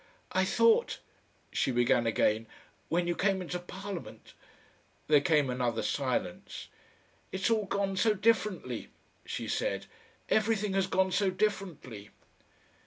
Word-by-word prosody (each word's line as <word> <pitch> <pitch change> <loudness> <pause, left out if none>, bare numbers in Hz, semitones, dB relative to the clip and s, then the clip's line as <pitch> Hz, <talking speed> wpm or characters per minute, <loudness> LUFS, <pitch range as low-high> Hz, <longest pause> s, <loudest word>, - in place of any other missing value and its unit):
"I - - +2
thought," 465 +1 +3 0.5
she - - +1
began 120 -1 +3
again, 110 0 +2 0.4
"when 175 +1 +1
you 175 - +1
came 195 0 +1
into 180 -1 -4
Parliament 190 +1 -8 0.4
" - - -35
There 150 -2 +6
came 150 -2 +3
another 125 -3 -1
silence. - - -2 0.6
"It's 190 +4 0
all 215 -2 +2
gone 195 0 -1
so 215 +1 +3
differently," 210 -1 0 0.4
she - - -4
said. - - -1 0.4
"Everything 215 -2 +1
has 195 -1 +2
gone 190 0 +2
so 195 +1 +2
differently." 185 - -3
185 Hz, 125 wpm, -30 LUFS, 140-205 Hz, 0.6 s, There